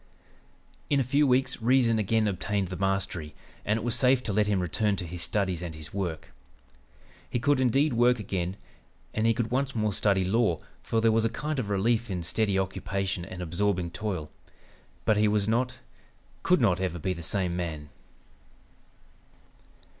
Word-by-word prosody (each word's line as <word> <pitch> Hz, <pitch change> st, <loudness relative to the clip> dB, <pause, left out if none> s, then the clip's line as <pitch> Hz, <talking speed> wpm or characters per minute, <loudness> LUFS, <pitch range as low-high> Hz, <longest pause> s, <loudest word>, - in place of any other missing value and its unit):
"In 140 Hz, -, +3 dB
a -, -, +3 dB
few 140 Hz, +4 st, +2 dB
weeks 130 Hz, -1 st, +1 dB
reason 120 Hz, -1 st, +3 dB
again 110 Hz, +1 st, +2 dB
obtained 100 Hz, -1 st, -1 dB
the 90 Hz, -, -4 dB
mastery, 95 Hz, -5 st, -2 dB, 0.3 s
and 105 Hz, +1 st, +1 dB
it -, -, -4 dB
was 120 Hz, -1 st, 0 dB
safe 125 Hz, -1 st, +4 dB
to 105 Hz, -, -2 dB
let 105 Hz, +1 st, +2 dB
him 100 Hz, -2 st, +1 dB
return 100 Hz, +4 st, 0 dB
to 90 Hz, -, -4 dB
his 85 Hz, +1 st, -6 dB
studies 95 Hz, -1 st, 0 dB
and 85 Hz, -3 st, -5 dB
his 80 Hz, 0 st, -10 dB
work. 90 Hz, -5 st, -4 dB, 1.0 s
He -, -, -1 dB
could 145 Hz, +2 st, +2 dB
indeed 135 Hz, +3 st, +3 dB
work 120 Hz, +1 st, +4 dB
again, 95 Hz, -3 st, -3 dB, 0.6 s
and 110 Hz, +1 st, +1 dB
he 115 Hz, -, +3 dB
could 115 Hz, 0 st, -2 dB
once 135 Hz, +1 st, 0 dB
more 105 Hz, -2 st, 0 dB
study 95 Hz, -1 st, +2 dB
law, 105 Hz, -3 st, +2 dB, 0.2 s
for 115 Hz, -, 0 dB
there 115 Hz, 0 st, +4 dB
was 110 Hz, 0 st, +2 dB
a 115 Hz, -, +2 dB
kind 150 Hz, +5 st, -3 dB
of 110 Hz, -5 st, -3 dB
relief 110 Hz, +3 st, +1 dB
in 90 Hz, -3 st, -3 dB
steady 100 Hz, +3 st, 0 dB
occupation 95 Hz, -1 st, -2 dB
and 90 Hz, +1 st, -7 dB
absorbing 90 Hz, 0 st, 0 dB
toil, 90 Hz, -5 st, -4 dB, 0.7 s
but 110 Hz, -, +3 dB
he 105 Hz, 0 st, +4 dB
was 105 Hz, -1 st, +1 dB
not, 125 Hz, +3 st, 0 dB, 0.6 s
could 180 Hz, -, +3 dB
not 95 Hz, -7 st, +2 dB
ever 90 Hz, -2 st, -1 dB
be 90 Hz, +3 st, -1 dB
the 85 Hz, -, -8 dB
same 90 Hz, +1 st, -1 dB
man. 80 Hz, -4 st, -4 dB
105 Hz, 175 wpm, -28 LUFS, 90-115 Hz, 1.0 s, safe